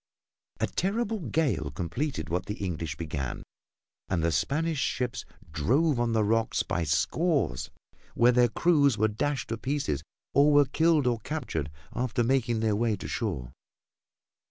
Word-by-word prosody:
A - - +2
terrible 220 +3 -1
gale 135 - 0
completed 90 - -3
what 90 +3 -2
the 105 - -3
English 85 -6 -4
began 75 -6 -4 0.7
and 85 -3 0
the 85 - +2
Spanish 155 - 0
ships 125 -2 -2 0.3
drove 130 - +2
on 120 -1 +1
the 110 -1 +3
rocks 115 +2 +1
by 90 -6 -1
scores, 80 - 0 0.5
where 120 +1 +5
their 120 0 +4
crews 145 -3 +3
were 110 +1 +3
dashed 135 +6 -2
to 115 - -2
pieces 130 - -1 0.3
or 145 +2 +5
were 145 0 +6
killed 160 0 +2
or 120 -2 +1
captured 110 - -3 0.2
after 120 0 0
making 120 -2 +1
their 110 -2 +2
way 115 0 +1
to 95 - -7
shore. 75 - -3
115 Hz, 150 wpm, -28 LUFS, 90-145 Hz, 0.7 s, were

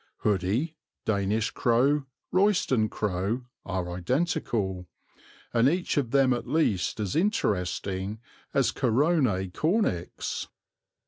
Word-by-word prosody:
Hoodie, 105 - 0 0.3
Danish 105 +1 +1
crow, 135 +4 +2 0.2
Royston 180 - +3
crow 105 +5 -2 0.2
are 95 -2 -2
identical, 95 - -1 0.7
and 120 +3 +5
each 175 +3 -1
of 140 -5 +1
them 135 0 +4
at 120 0 -4
least 120 - +1
as 100 -4 -2
interesting 100 - 0 0.3
as - - +2
Corone 125 - +2
cornix. 155 - -1
115 Hz, 100 wpm, -27 LUFS, 95-145 Hz, 0.7 s, and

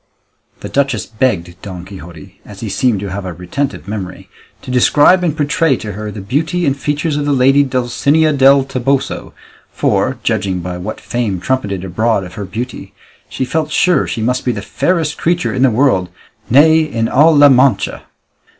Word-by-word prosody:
The - - -6
duchess 135 -7 0
begged 95 -7 -2
Don 90 -3 -8
Quixote, 85 -5 -12
as 100 -2 -12
he 110 - -4
seemed 115 +1 +1
to 100 -2 -5
have 100 +1 -4
a 90 -1 -5
retentive 95 - -4
memory, 100 -3 -6 0.3
to - - -7
describe 145 +8 +4
and 160 -3 -1
portray 145 -1 +1
to 105 - -6
her 105 +2 -6
the 105 -1 -7
beauty 160 - -1
and 140 -2 +1
features 150 +2 -2
of 145 - -2
the - - +1
lady 135 +1 +4
Dulcinea 140 +4 +1
del 135 0 +5
Toboso, 135 +1 -2 0.4
for, - - 0
judging 95 -1 -1
by 90 0 -5
what 110 +5 -6
fame 110 -6 -3
trumpeted 100 -4 -2
abroad 110 +3 0
of 90 -1 -10
her 100 +1 -6
beauty, 115 +7 -7 0.3
she 130 - -3
felt 155 +3 -2
sure 175 -1 +2
she 110 - -3
must 125 +2 0
be 125 - 0
the 100 -4 -5
fairest 160 - -1
creature 175 +1 0
in 130 - -2
the 135 - +5
world, 110 -7 +1 0.4
nay, 155 +6 +6
in 115 -8 -1
all 155 +6 +4
La 145 0 +7
Mancha. 130 -6 +2
125 Hz, 180 wpm, -15 LUFS, 100-145 Hz, 0.4 s, La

